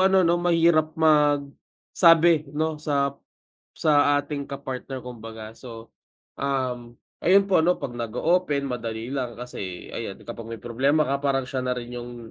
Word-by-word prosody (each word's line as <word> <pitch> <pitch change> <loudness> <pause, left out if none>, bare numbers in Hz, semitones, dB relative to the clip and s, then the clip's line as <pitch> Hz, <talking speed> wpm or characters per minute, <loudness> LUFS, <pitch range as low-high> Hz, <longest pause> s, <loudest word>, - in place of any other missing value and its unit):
ano 190 -1 +5
no, 170 +1 +2
mahirap 165 -2 +3
magsabi 155 +2 +3
no 155 -1 -1
sa 140 -2 0 0.6
sa 145 -2 +3
ating 140 -1 -5
ka-partner 135 -1 -6
kumbaga, 115 -3 -9
so, 115 -1 -11 0.5
um, 125 -3 -2 0.2
ayun 195 +3 +5
po 185 - +5
ano 175 +3 +3
pag - - -6
nag-oopen 140 +7 0
madali 115 0 -4
lang 130 -4 -3
kasi 100 -7 -7
ayan 105 -4 -6
kapag 115 -1 -8
may 115 - -12
problema 135 +6 +2
ka 140 0 0
parang 140 -1 0
siya 130 -1 -2
na 125 - +1
rin 120 -1 -7
yung 120 -1 -9
140 Hz, 145 wpm, -25 LUFS, 120-155 Hz, 0.6 s, ano